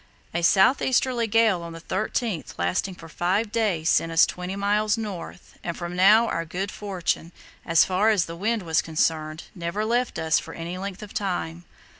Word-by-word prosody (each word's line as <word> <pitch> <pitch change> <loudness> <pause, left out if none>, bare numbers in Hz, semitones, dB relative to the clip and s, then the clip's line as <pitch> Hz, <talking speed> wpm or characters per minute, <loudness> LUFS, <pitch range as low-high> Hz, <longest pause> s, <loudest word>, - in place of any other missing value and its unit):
A 175 - -1
south 190 +9 +4
easterly 250 -2 +1
gale 220 -4 +3
on 170 0 -7
the 165 - -8
13th 195 +1 -3
lasting 90 - -1
for 165 - -12
five 190 +7 -1
days 200 -9 0
sent 165 -1 +2
us 165 - +6
twenty 180 +1 -5
miles 210 +2 +1
north, 200 -5 -7
and 170 - -4
from 175 0 -5
now 210 +5 +6
our 165 - -1
good 190 +5 -4
fortune, 180 -4 -3 0.4
as 165 -2 +5
far 190 +4 +2
as 200 -5 +3
the 165 - -7
wind 215 +4 -1
was 160 -2 +2
concerned, 155 0 -1
never 175 +4 -3
left 240 +3 0
us 160 0 +2
for - - -9
any 170 +2 -5
length 195 +1 -6
of 205 - -10
time. 175 -3 -3
185 Hz, 185 wpm, -25 LUFS, 165-210 Hz, 0.4 s, us